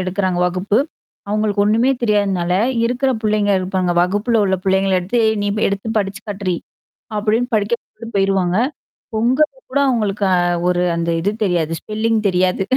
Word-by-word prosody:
எடுக்கறாங்க 185 Hz, -1 st, -1 dB
வகுப்பு. 185 Hz, +4 st, 0 dB, 0.5 s
அவுங்களுக்கு 210 Hz, -1 st, +1 dB
ஒன்னுமே 230 Hz, +5 st, +3 dB
தெரியாதுன்னால 195 Hz, -5 st, +1 dB, 0.3 s
இருக்கிற 250 Hz, +3 st, +1 dB
புள்ளைங்க 210 Hz, -1 st, +2 dB
இருப்பாங்க. 185 Hz, -1 st, -1 dB
வகுப்புல 210 Hz, +5 st, +1 dB
உள்ள 190 Hz, -1 st, +1 dB
புள்ளைங்கள 190 Hz, 0 st, +2 dB
எடுத்து, 215 Hz, +7 st, 0 dB
ஏ -, -, +4 dB
நீ 205 Hz, -, 0 dB, 0.2 s
எடுத்து 200 Hz, +2 st, -3 dB
படிச்சு 200 Hz, +1 st, -3 dB
காட்டுடி! 190 Hz, -3 st, -2 dB, 0.6 s
அப்பிடின்னு 225 Hz, +4 st, 0 dB
படிக்க 210 Hz, +3 st, +1 dB
சொல்லிட்டு 230 Hz, +1 st, -12 dB
போயிருவாங்க. 195 Hz, -2 st, +1 dB, 0.6 s
பொங்கலுக்கு 260 Hz, -, +1 dB
கூட 280 Hz, -, +1 dB
அவுங்களுக்கு 210 Hz, -5 st, 0 dB
அ -, -, +2 dB, 0.3 s
ஒரு 180 Hz, 0 st, +1 dB
அந்த 170 Hz, 0 st, -1 dB
இது 200 Hz, +4 st, +1 dB
தெரியாது. 170 Hz, -4 st, 0 dB
ஸ்பெல்லிங் 220 Hz, +1 st, 0 dB
தெரியாது. 185 Hz, +1 st, +1 dB
205 Hz, 145 wpm, -18 LUFS, 185-220 Hz, 0.6 s, ஏ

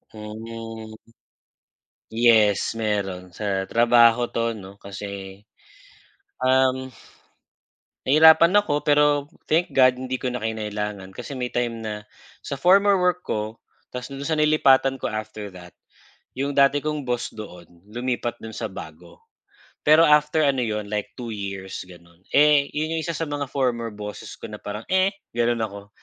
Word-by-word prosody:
Mhm. 110 Hz, +1 st, -8 dB, 1.2 s
Yes, 110 Hz, -3 st, +3 dB
meron. 100 Hz, -5 st, -2 dB
Sa 95 Hz, +1 st, -2 dB
trabaho 120 Hz, 0 st, +5 dB
'to 115 Hz, 0 st, -1 dB
'no, 100 Hz, -3 st, -10 dB
kasi, 100 Hz, -1 st, -8 dB, 1.0 s
um, 130 Hz, 0 st, +2 dB, 1.2 s
nahirapan 160 Hz, +5 st, +7 dB
ako, 150 Hz, -8 st, +2 dB
pero 145 Hz, -1 st, +3 dB, 0.2 s
thank 165 Hz, +3 st, +1 dB
God, 130 Hz, -1 st, +4 dB
hindi 130 Hz, 0 st, -3 dB
ko 125 Hz, -1 st, -3 dB
na 125 Hz, -, -4 dB
kinailangan 105 Hz, -3 st, -4 dB
kasi 140 Hz, +7 st, -7 dB
may 125 Hz, -1 st, -4 dB
time 115 Hz, -2 st, -2 dB
na 105 Hz, -1 st, -6 dB, 0.3 s
sa 140 Hz, -, -5 dB
former 195 Hz, +6 st, +5 dB
work 180 Hz, -1 st, +1 dB
ko, 110 Hz, -3 st, -4 dB, 0.3 s
tapos 125 Hz, +1 st, -6 dB
dun 140 Hz, +1 st, -7 dB
sa 165 Hz, -, -2 dB
nilipatan 135 Hz, -3 st, +4 dB
ko 120 Hz, -, -4 dB
after 110 Hz, -1 st, -6 dB
that 90 Hz, -1 st, -13 dB, 0.6 s
yung 140 Hz, +1 st, -1 dB
dati 140 Hz, +1 st, +4 dB
kong 150 Hz, -1 st, -1 dB
boss 125 Hz, -2 st, -3 dB
doon, 90 Hz, -5 st, -10 dB, 0.2 s
lumipat 120 Hz, +1 st, -3 dB
dun 110 Hz, 0 st, -9 dB
sa 110 Hz, 0 st, -4 dB
bago. 85 Hz, -2 st, -12 dB, 0.6 s
Pero 155 Hz, +2 st, +6 dB
after 150 Hz, 0 st, +4 dB
ano 135 Hz, -2 st, +1 dB
'yon, 105 Hz, -2 st, -2 dB
like, 105 Hz, -1 st, -2 dB
2 120 Hz, -3 st, -5 dB
years 95 Hz, -2 st, -6 dB
gano'n. 85 Hz, 0 st, -17 dB
Eh, 145 Hz, -1 st, +4 dB
yun 155 Hz, +2 st, -2 dB
yung 165 Hz, -, -1 dB
isa 165 Hz, -1 st, -4 dB
sa 165 Hz, -, -2 dB
mga 145 Hz, -3 st, -4 dB
former 120 Hz, -4 st, -1 dB
bosses 105 Hz, -1 st, -8 dB
ko -, -, -9 dB
na -, -, -9 dB
parang, 105 Hz, +2 st, -6 dB
eh, 190 Hz, +1 st, +3 dB, 0.2 s
gano'n 120 Hz, 0 st, +1 dB
ako 100 Hz, -2 st, -5 dB
120 Hz, 150 wpm, -23 LUFS, 105-140 Hz, 1.2 s, nahirapan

